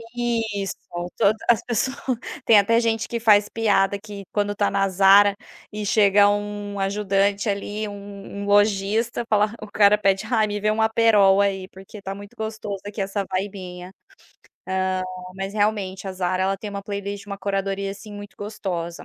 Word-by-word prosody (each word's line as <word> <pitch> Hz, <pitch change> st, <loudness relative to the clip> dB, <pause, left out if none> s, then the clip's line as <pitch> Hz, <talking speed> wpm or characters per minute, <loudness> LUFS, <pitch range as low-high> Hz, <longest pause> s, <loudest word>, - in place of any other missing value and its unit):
Isso, 225 Hz, -5 st, -2 dB, 0.4 s
toda 205 Hz, +2 st, +4 dB
as 235 Hz, -, +5 dB
pessoas 255 Hz, +3 st, -1 dB, 0.5 s
tem 220 Hz, -, +7 dB
até 230 Hz, +3 st, +4 dB
gente 225 Hz, 0 st, 0 dB
que 235 Hz, -, -3 dB
faz 210 Hz, -2 st, +4 dB
piada 200 Hz, -3 st, +1 dB
que 205 Hz, -1 st, -9 dB
quando 205 Hz, 0 st, -1 dB
tá 205 Hz, 0 st, +1 dB
na 195 Hz, 0 st, +2 dB
Zara 200 Hz, +2 st, +6 dB, 0.4 s
e 210 Hz, 0 st, -4 dB
chega 205 Hz, -1 st, +5 dB
um 205 Hz, 0 st, -3 dB
ajudante 200 Hz, +1 st, 0 dB
ali, 205 Hz, +1 st, -3 dB
um 200 Hz, 0 st, -9 dB, 0.2 s
um 200 Hz, -, -4 dB
lojista 205 Hz, +3 st, +2 dB
fala, 210 Hz, 0 st, +2 dB
o 215 Hz, -, -7 dB
cara 205 Hz, 0 st, +5 dB
pede: 195 Hz, -2 st, +1 dB
"Ai, 220 Hz, -3 st, +2 dB
me 205 Hz, 0 st, -3 dB
vê 215 Hz, +1 st, +1 dB
um 220 Hz, +1 st, 0 dB
Aperol 215 Hz, -3 st, +4 dB
aí, 190 Hz, -2 st, 0 dB
porque 195 Hz, +2 st, -12 dB
tá 195 Hz, 0 st, -5 dB
muito 200 Hz, 0 st, -12 dB
gostoso 215 Hz, -2 st, -5 dB
aqui 205 Hz, 0 st, -5 dB
essa 195 Hz, 0 st, -2 dB
vibinha". 185 Hz, -2 st, -5 dB, 0.8 s
Hã, 190 Hz, 0 st, 0 dB, 0.5 s
mas 195 Hz, +1 st, -4 dB
realmente 205 Hz, -2 st, -1 dB
a -, -, -4 dB
Zara, 185 Hz, 0 st, -1 dB
ela 195 Hz, 0 st, 0 dB
tem 205 Hz, +1 st, -7 dB
uma 200 Hz, 0 st, -5 dB
playlist, 200 Hz, 0 st, -5 dB
uma 200 Hz, -1 st, -5 dB
curadoria, 195 Hz, 0 st, -2 dB
assim, 205 Hz, +2 st, -10 dB
muito 205 Hz, 0 st, -9 dB
gostosa. 185 Hz, -5 st, -5 dB
205 Hz, 170 wpm, -23 LUFS, 195-215 Hz, 0.8 s, tem